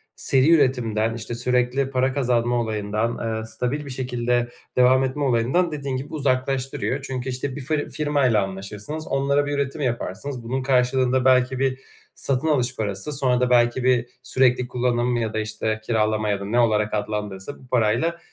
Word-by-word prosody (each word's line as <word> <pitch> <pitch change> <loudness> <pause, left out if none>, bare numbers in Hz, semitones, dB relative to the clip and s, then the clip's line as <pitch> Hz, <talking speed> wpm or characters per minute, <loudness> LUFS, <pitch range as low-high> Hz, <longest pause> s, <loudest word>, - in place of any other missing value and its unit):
seri 135 +3 +3
üretimden, 120 -7 +2
işte, 115 0 -5
sürekli 125 +2 +1
para 130 0 +1
kazanma 120 -3 +1
olayından, 110 +1 -2
eee, 110 - -6
stabil 125 +6 -3
bir - - -8
şekilde 125 -2 -1 0.3
devam 130 +1 +5
etme 135 +2 -2
olayından 130 +8 +2
dediğin 140 -3 -3
gibi 140 +5 -7
uzaklaştırıyor. 135 -1 -1
Çünkü, 130 -1 -4
işte, 130 +1 -3
bir 145 - -6
fır 150 +2 -2
firmayla 140 -9 +2
anlaşırsınız, 105 +11 -6
onlara 140 +1 +1
bir 145 - -3
üretim 140 +1 -2
yaparsınız. 120 +1 -3
Bunun 130 +3 -2
karşılığında 130 0 +2
belki 130 0 +3
bir 135 -1 0 0.4
satın 135 +3 0
alış 130 -5 +1
parası, 105 +5 -3
sonra 130 -3 +1
da 125 - +2
belki 120 +1 +3
bir 125 -2 +3 0.2
sürekli 125 -1 +2
kullanım 125 0 0
ya 110 -2 -2
da, 110 - -1
işte, 110 0 -2
kiralama 110 -1 +1
ya 100 - 0
da 100 - -6
ne 115 +4 +1
olarak 110 -2 +2
adlandırılırsa 105 +2 -4
bu 130 - -17
parayla 125 +9 +1
125 Hz, 165 wpm, -23 LUFS, 115-135 Hz, 0.4 s, devam